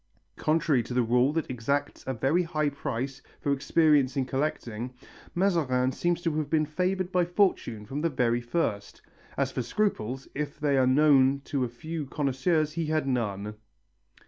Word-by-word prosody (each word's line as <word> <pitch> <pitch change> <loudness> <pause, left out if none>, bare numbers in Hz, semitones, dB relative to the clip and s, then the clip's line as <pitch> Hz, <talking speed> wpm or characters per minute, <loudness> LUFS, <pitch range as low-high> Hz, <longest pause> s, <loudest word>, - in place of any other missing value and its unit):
Contrary 155 -4 +2
to 120 +2 -6
the 125 - +3
rule 125 +4 +3
that 160 0 -1
exacts 130 +3 -2
a 130 - 0
very 135 +10 +2
high 155 -3 0
price 135 -2 -4 0.2
for 140 -2 0
experience 145 -1 +3
in 135 - +1
collecting, 125 -4 -3 0.4
Mazarin 150 -9 +2
seems 175 +4 -1
to 165 -3 0
have 150 -2 -2
been 155 0 +2
favoured 185 +4 -1
by 180 -1 +3
fortune 175 - 0
from 140 +6 -4
the 165 - +1
very 120 -4 +1
first; 120 -6 -2 0.3
as - - 0
for - - -2
scruples, 130 - -1
if 145 0 -4
they 145 -2 +2
are 130 -1 +4
known 135 0 +5
to 140 -1 -2
a 125 - -2
few 155 +5 -6
connoisseurs 150 +3 0
he 165 0 -2
knew 155 0 +1
none. 105 -6 -2
140 Hz, 170 wpm, -28 LUFS, 125-160 Hz, 0.4 s, known